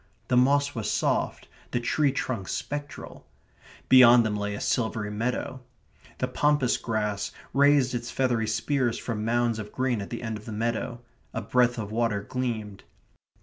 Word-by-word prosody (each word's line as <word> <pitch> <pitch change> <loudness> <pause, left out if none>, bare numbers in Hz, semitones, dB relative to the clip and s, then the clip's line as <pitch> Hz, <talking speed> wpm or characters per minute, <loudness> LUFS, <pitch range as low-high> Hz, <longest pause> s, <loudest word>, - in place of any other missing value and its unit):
The - - +3
moss 140 +3 +3
was 115 -3 -3
soft; - - 0 0.2
the 120 - -1
tree 140 +4 +1
trunks 120 -7 -3
spectral. 145 0 -6 0.6
Beyond 125 -2 +8
them 105 -1 -1
lay 105 0 -2
a - - -6
silvery 110 -3 -1
meadow. 125 +4 -3 0.6
The 125 - -1
pampas 145 0 +2
grass 105 -3 -2 0.2
raised 140 -2 +4
its 120 0 -3
feathery 120 -4 0
spears 120 +2 0
from 110 -3 -4
mounds 115 0 +1
of 105 -1 -7
green 130 -4 -1
at 100 - -7
the 120 0 -6
end 110 -2 -3
of 105 - -16
the 115 - -7
meadow. 120 +2 -2 0.3
A - - -1
breadth 125 +2 +2
of 105 -2 -5
water 110 -3 0
gleamed. 110 -5 -4
120 Hz, 160 wpm, -27 LUFS, 110-130 Hz, 0.6 s, Beyond